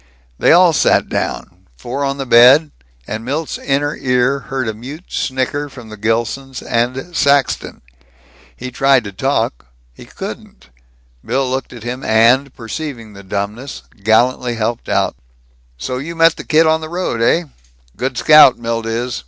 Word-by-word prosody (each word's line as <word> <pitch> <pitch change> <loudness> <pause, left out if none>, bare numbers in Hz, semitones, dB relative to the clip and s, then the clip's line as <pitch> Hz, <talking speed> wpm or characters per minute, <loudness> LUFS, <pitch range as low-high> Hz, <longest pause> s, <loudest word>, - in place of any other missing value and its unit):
They - - +4
all 175 0 +6
sat - - +2
down, - - -4
four 130 - -4
on 140 0 -1
the 135 - -4
bed; 130 +6 +6 0.3
and 110 - -5
Milt's 145 +6 -3
inner 145 +1 -1
ear 125 +2 +1
heard 135 -2 -4
a 110 - -2
mute 135 +10 -10
snicker 135 +2 -2
from 125 -5 -12
the 110 - -9
Gilsons 115 +5 -2
and 125 +8 -2
Saxton. 140 - +1 0.7
He 125 - -7
tried 135 0 +3
to 100 - -7
talk. - - -2 0.3
He - - -14
couldn't. - - -9 0.5
Bill 130 +3 -1
looked 130 +1 -3
at 120 -3 -11
him 125 +2 -5
and, 120 +5 +3
perceiving 115 -2 -7
the 100 - -11
dumbness, 100 +7 -5 0.2
gallantly 120 +3 +2
helped 115 +1 -3
out: - - 0 0.6
"So 125 - -4
you 165 +5 -6
met 165 0 +4
the - - -9
kid 160 +1 +4
on 160 0 +2
the 155 - -7
road, 170 -9 -3
eh? 165 +9 +3 0.5
Good 130 -1 -3
scout, 150 -4 +7
Milt 115 -1 -3
is. 120 +1 -3
130 Hz, 160 wpm, -17 LUFS, 115-140 Hz, 0.7 s, scout